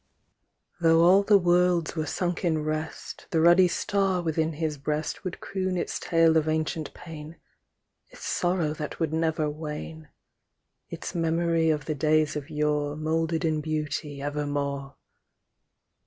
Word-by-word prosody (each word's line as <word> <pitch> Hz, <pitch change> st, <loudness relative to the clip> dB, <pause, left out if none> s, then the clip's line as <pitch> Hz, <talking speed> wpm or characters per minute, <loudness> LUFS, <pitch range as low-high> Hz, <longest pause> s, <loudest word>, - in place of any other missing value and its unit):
Though 165 Hz, -1 st, +5 dB
all 185 Hz, +3 st, +6 dB
the 200 Hz, 0 st, +5 dB
worlds 175 Hz, -2 st, +2 dB
were 155 Hz, -1 st, -2 dB
sunk 175 Hz, 0 st, -2 dB
in 160 Hz, -3 st, +1 dB
rest 155 Hz, +1 st, -5 dB
The 165 Hz, -, +1 dB
ruddy 175 Hz, +3 st, +6 dB
star 195 Hz, +1 st, 0 dB
within 160 Hz, 0 st, 0 dB
his 155 Hz, -1 st, -3 dB
breast 150 Hz, +5 st, -3 dB
Would 185 Hz, -2 st, -5 dB
croon 185 Hz, -1 st, -2 dB
its -, -, -2 dB
tale 165 Hz, -1 st, +3 dB
of 160 Hz, -1 st, +1 dB
ancient 155 Hz, -1 st, -2 dB
pain, 160 Hz, -1 st, -10 dB, 0.7 s
Its -, -, -11 dB
sorrow 175 Hz, -4 st, 0 dB
that 150 Hz, -1 st, -6 dB
would 160 Hz, -2 st, -1 dB
never 160 Hz, -1 st, 0 dB
wane, 155 Hz, +1 st, -6 dB, 0.8 s
Its -, -, -6 dB
memory 165 Hz, 0 st, +1 dB
of 150 Hz, -3 st, 0 dB
the 155 Hz, -, -1 dB
days 155 Hz, +1 st, +2 dB
of 150 Hz, 0 st, -5 dB
yore 150 Hz, -1 st, 0 dB
Moulded 160 Hz, +2 st, -1 dB
in 155 Hz, -1 st, 0 dB
beauty 150 Hz, -2 st, -3 dB
evermore. 145 Hz, -1 st, -3 dB
160 Hz, 140 wpm, -27 LUFS, 150-170 Hz, 0.8 s, all